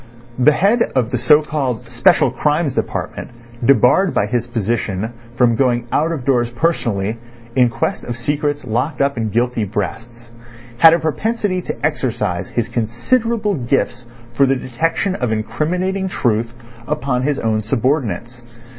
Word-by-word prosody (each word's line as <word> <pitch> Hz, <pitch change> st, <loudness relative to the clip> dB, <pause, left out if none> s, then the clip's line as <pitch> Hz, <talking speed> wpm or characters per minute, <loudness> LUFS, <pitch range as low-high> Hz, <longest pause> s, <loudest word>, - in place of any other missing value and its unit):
The 150 Hz, +4 st, +5 dB
head 205 Hz, +9 st, +2 dB
of 125 Hz, -2 st, +1 dB
the 125 Hz, -, 0 dB
so 150 Hz, +5 st, +5 dB
called 130 Hz, -6 st, -3 dB
Special 125 Hz, +3 st, +3 dB
Crimes 150 Hz, +2 st, 0 dB
Department -, -, -3 dB, 0.3 s
debarred 140 Hz, -, +4 dB
by -, -, +2 dB
his 120 Hz, +2 st, -2 dB
position 110 Hz, -2 st, -2 dB, 0.2 s
from 125 Hz, -2 st, +3 dB
going 120 Hz, -1 st, +1 dB
out 160 Hz, +3 st, +1 dB
of 145 Hz, -7 st, -4 dB
doors 120 Hz, -3 st, +2 dB
personally 115 Hz, -, -1 dB, 0.4 s
in 125 Hz, -2 st, +4 dB
quest 115 Hz, 0 st, -2 dB
of 120 Hz, 0 st, -5 dB
secrets 145 Hz, +3 st, -2 dB
locked 125 Hz, +6 st, -2 dB
up 140 Hz, 0 st, +1 dB
in 115 Hz, -2 st, -2 dB
guilty 120 Hz, +1 st, 0 dB
breasts, 115 Hz, +4 st, -5 dB, 0.5 s
had 165 Hz, 0 st, +8 dB
a -, -, -1 dB
propensity 190 Hz, +4 st, -1 dB
to -, -, -4 dB
exercise -, -, -1 dB
his -, -, -1 dB
considerable 210 Hz, -, 0 dB
gifts 125 Hz, -3 st, -1 dB, 0.3 s
for 135 Hz, +3 st, +3 dB
the 135 Hz, -, +2 dB
detection 165 Hz, +9 st, -1 dB
of 125 Hz, -10 st, -2 dB
incriminating 180 Hz, -, -1 dB
truth 115 Hz, -, 0 dB, 0.4 s
upon 140 Hz, -4 st, -1 dB
his 145 Hz, +1 st, 0 dB
own 110 Hz, -1 st, 0 dB
subordinates. 120 Hz, 0 st, -1 dB
125 Hz, 145 wpm, -18 LUFS, 115-155 Hz, 0.5 s, had